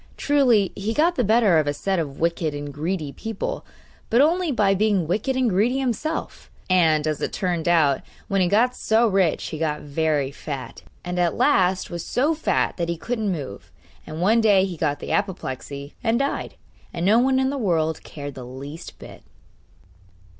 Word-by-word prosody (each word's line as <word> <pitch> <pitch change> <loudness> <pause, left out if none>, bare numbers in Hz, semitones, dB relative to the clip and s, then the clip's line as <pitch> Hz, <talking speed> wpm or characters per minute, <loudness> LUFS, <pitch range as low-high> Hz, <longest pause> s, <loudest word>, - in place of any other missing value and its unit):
Truly, 250 -9 +3
he 215 +3 -3
got 335 +4 +3
the 255 - 0
better 215 -5 +4
of 150 - -1
a 145 - 0
set 190 +3 -1
of 140 -4 -4
wicked 165 -2 0
and 145 0 -6
greedy 155 0 -3
people, 220 - -5 0.5
but 235 - +3
only 335 +3 +3
by 205 -6 +3
being 200 -3 +1
wicked 210 - -1
and 260 -1 +2
greedy 220 +6 +2
himself; 270 +5 -3 0.2
and, 160 -4 +4
as 155 -1 -2
it - - -2
turned 175 -3 -2
out, 155 -6 +3 0.3
when 195 -1 +1
he 180 - +3
got 235 +7 +2
so 225 +2 +2
rich 190 -6 +1
he 155 - -6
got 150 -2 -1
very 145 -2 0
fat; 140 -2 -7 0.2
and 180 0 -3
at 175 -1 +1
last 185 -1 +2
was 170 -1 -4
so 290 +6 +1
fat 315 - 0
that 170 -1 -2
he 170 - -2
couldn't 220 +2 -2
move, 135 - -6 0.4
and 155 +2 -6
one 225 +4 +4
day 200 -4 +4
he 185 -3 -5
got 150 -2 -1
the - - -6
apoplexy 140 -7 -3
and 225 +1 +2
died, 275 +2 -2 0.4
and 170 0 -3
no 215 +4 +5
one 260 +1 +3
in 265 0 +1
the - - -3
world 160 -7 0
cared 145 -2 -8
the 130 - -9
least 135 +6 -9
bit. - - -12
185 Hz, 190 wpm, -23 LUFS, 155-225 Hz, 0.5 s, no